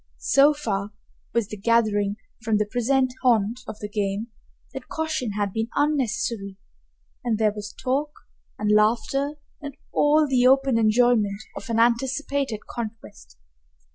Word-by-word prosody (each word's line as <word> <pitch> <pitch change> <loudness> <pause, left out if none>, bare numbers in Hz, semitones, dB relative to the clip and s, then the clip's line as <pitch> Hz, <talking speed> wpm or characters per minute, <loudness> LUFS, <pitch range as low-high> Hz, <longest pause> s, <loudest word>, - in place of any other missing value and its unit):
So 285 +2 +4
far 205 -7 -3 0.4
was 235 -3 0
the 215 - -6
gathering 205 -2 +2 0.3
from 220 -2 +1
the 210 - +1
present 255 +3 +1
haunt 235 -2 +2
of - - -7
the 210 - -6
game 205 +2 -2 0.4
that - - -7
caution 315 -9 -2
had 205 -2 -2
been 225 +1 -2
unnecessary, 235 -8 -1 0.7
and 230 -3 0
there 215 -1 +2
was 205 -1 -7
talk 280 +4 -1 0.5
and 210 0 0
laughter 235 +7 +2 0.3
and 285 -1 -8 0.2
all 300 +1 +4
the 255 -2 +3
open 270 -2 +4
enjoyment 220 -2 +2
of - - -8
an 230 0 +1
anticipated 260 0 0
conquest. 215 - -8
230 Hz, 140 wpm, -24 LUFS, 210-265 Hz, 0.7 s, So